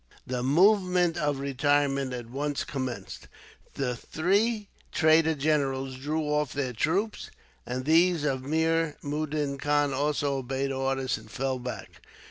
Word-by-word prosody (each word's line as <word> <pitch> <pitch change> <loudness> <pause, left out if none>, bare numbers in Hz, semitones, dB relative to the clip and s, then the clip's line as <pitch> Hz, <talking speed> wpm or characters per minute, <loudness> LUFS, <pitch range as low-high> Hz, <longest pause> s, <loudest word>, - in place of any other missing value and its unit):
The 125 -1 -2
movement 180 - +4
of 145 -2 0
retirement 140 0 +1
at 120 -2 -5
once 145 +2 -2
commenced. 130 -8 -5 0.5
The 125 -3 -1
three 205 - 0 0.2
traitor 160 0 +4
generals 135 -3 0
drew 150 +4 -2
off 150 -3 0
their 135 -3 -2
troops, 185 - -1 0.4
and 130 +1 -3
those 165 +1 +4
of 135 -3 0
Mir 160 +2 +1
Mudin 145 -1 -2
Khan 145 0 +1
also 145 0 0
obeyed 135 +1 -2
orders, 135 -2 -1
and 110 0 -15
fell 130 +4 -2
back. 125 0 -7
145 Hz, 130 wpm, -28 LUFS, 135-160 Hz, 0.5 s, movement